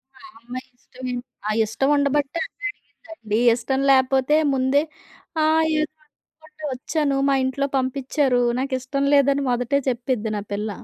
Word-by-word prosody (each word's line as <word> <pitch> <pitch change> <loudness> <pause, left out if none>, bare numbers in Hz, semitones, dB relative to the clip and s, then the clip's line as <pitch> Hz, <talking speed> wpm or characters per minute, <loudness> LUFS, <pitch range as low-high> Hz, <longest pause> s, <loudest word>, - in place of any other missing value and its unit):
ఆ - - -19 0.2
అమ్మాయి 250 +3 -8
ఇష్టమే. 255 0 -7 0.3
అ - - 0 0.2
ఇష్టం 225 +6 -1
ఉండబట్టే 285 +2 +1
అన్నడిగిందండి. 325 - -6 0.2
ఇష్టం 265 +3 -1
లేపోతే 265 +2 +3 0.2
ముందే 265 +2 +2 0.6
ఆ! - - +3 0.4
ఏదో 305 0 -2 0.2
రమ్మంటే 310 0 -20
ఒచ్చాను 280 +2 -1
మా - - +3
ఇంట్లో 260 +2 -1
పంపిచారు. 260 0 +1 0.2
నాకిష్టం 265 +1 -2
లేదని 280 0 +3
మొదటే 245 +3 +1
చెప్పిద్ది 245 -2 -2
నా - - -3
పిల్ల. 210 +2 -2
265 Hz, 125 wpm, -22 LUFS, 250-285 Hz, 0.6 s, లేపోతే